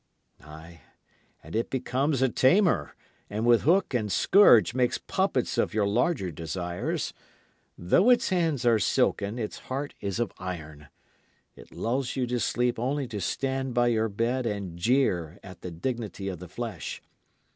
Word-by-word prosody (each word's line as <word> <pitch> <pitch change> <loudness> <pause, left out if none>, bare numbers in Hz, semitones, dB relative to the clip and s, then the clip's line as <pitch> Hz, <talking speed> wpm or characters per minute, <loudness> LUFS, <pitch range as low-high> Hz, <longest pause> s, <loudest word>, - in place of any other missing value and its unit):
Ay, 80 +2 -13 0.6
and 80 - -9
it 115 - -1
becomes 135 +1 0
a 130 - +3
tamer, 130 - +2 0.3
and 110 +3 -2
with 120 -1 +5
hook 180 +1 +2
and 110 -4 -1
scourge 120 - +5
makes 125 -1 +1
puppets - - -1
of - - 0
your 105 -2 +2
larger 105 - 0
desires. 85 +3 -4 0.6
Though 135 - +3
its 245 - +4
hands 165 - 0
are 115 -2 +4
silken, 100 +1 +1
its 110 -3 -4
heart 140 +3 -3
is 100 +1 -3
of 120 -4 -1
iron. 75 -5 -7 0.7
It - - -15
lulls 125 +2 -2
you 130 -2 0
to 125 0 -2
sleep 120 +1 0
only 135 +3 -1
to 105 -4 -5
stand 130 +5 -2
by 120 0 +3
your 110 -1 +1
bed 115 +4 -1
and 100 -5 -4
jeer 90 - +1
at 95 -2 -12
the 90 - -6
dignity 100 +2 -4
of 90 -4 -6
the 90 - -9
flesh. 115 +3 -5
115 Hz, 155 wpm, -27 LUFS, 95-130 Hz, 0.7 s, with